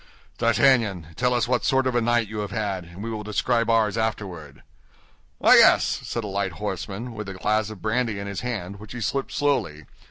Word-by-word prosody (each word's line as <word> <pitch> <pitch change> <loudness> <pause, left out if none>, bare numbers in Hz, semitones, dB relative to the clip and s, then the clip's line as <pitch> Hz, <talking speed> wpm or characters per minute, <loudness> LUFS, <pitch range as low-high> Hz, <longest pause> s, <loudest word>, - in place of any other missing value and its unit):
D'Artagnan, 115 - +2
tell 125 0 +1
us 120 -2 +1
what 125 -4 +1
sort 135 0 +2
of 130 - 0
a 120 - +2
night 120 -1 +2
you 105 +1 -6
have 105 -1 -3
had, 100 -3 -3
and 85 +4 -10
we 115 - -4
will 110 -1 -4
describe 115 +2 0
ours 115 -1 +2
afterward." 90 -10 -4 0.8
"Ah, - - +6
yes," - - +5
said 115 - -4
a - - -4
light 100 -2 -2
horseman, 105 +4 -5
with 105 -3 -6
a 95 - -7
glass 110 +3 0
of 110 -4 -10
brandy 115 -1 0
in 100 - -5
his 100 -1 -5
hand, 100 -5 -4
which 105 +2 -10
he 120 - -6
sipped 135 +6 -2
slowly. 115 - -1
110 Hz, 210 wpm, -24 LUFS, 100-120 Hz, 0.8 s, Ah